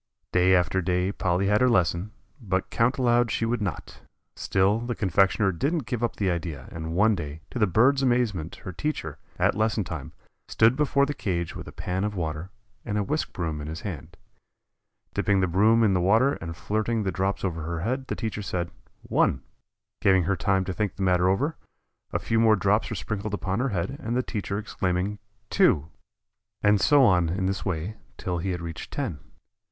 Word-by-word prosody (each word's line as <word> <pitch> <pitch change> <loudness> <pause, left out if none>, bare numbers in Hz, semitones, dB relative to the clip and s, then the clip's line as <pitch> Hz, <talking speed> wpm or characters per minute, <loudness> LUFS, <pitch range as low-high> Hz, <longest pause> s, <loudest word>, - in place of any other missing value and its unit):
Day 90 +1 +4
after 90 +1 +2
day 90 +1 0
Polly 90 -1 0
had 105 +3 +3
her 125 - +5
lesson, 90 -2 +1 0.3
but 95 -4 -2
count 115 +3 +2
aloud 120 -2 +3
she 115 - 0
would 115 0 -1
not. 100 -4 -5 0.3
Still 95 +3 +2
the 120 0 -3
confectioner 95 0 +2
didn't 140 - -1
give 125 -1 -3
up 120 - 0
the 95 -3 0
idea, 85 -3 -4
and 80 0 -5
one 110 +4 +4
day, 80 -4 -5
to 125 - -4
the 105 - +4
bird's 130 +9 +4
amazement 120 - 0
her 95 - -4
teacher, 85 - -4 0.2
at - - +3
lesson 110 0 +1
time, 85 - -6 0.4
stood 115 +3 +4
before 140 -1 +2
the 145 - -3
cage 85 - -3
with - - -7
a - - -8
pan 95 +2 -3
of 105 0 -2
water 80 0 -3 0.3
and 105 -2 -2
a 105 - +1
whisk 150 +9 -2
broom 80 -4 -3
in 75 - -6
his 80 +1 -6
hand. 85 -2 -7 1.0
Dipping 100 -1 +2
the 95 - +3
broom 105 +6 +4
in 105 -3 +4
the 90 - +2
water 110 +10 +4
and 85 0 -6
flirting 110 +2 -1
the 95 - -1
drops 95 +1 -1
over 85 -3 -2
her 80 0 -3
head 130 +7 -2
the - - -2
teacher 110 -3 -3
said, 90 -3 -3 0.3
"One." - - +1 0.6
Giving 95 -2 +4
her 100 +4 +1
time 95 -1 +1
to 95 - -3
think 105 -1 -2
the 95 - -3
matter 90 -1 +3
over, 140 +11 0 0.5
a - - +1
few 115 -1 0
more 110 -1 +5
drops 100 +2 +1
were 115 - -3
sprinkled 105 +4 -3
upon 100 0 -2
her 135 +2 +1
head, 100 +6 -3
the 120 +3 -1
teacher 100 -4 -3
exclaiming, 100 -1 -2 0.3
"Two," 75 +2 +3 0.7
and 105 -1 +4
so 145 -2 +5
on 90 -7 +4
in 95 +3 -1
this 95 +1 -1
way 95 +3 -3 0.2
till 90 -2 -2
he 95 +4 -2
had 90 -2 -2
reached 85 -2 -6
ten. - - -3
100 Hz, 200 wpm, -26 LUFS, 90-115 Hz, 1.0 s, her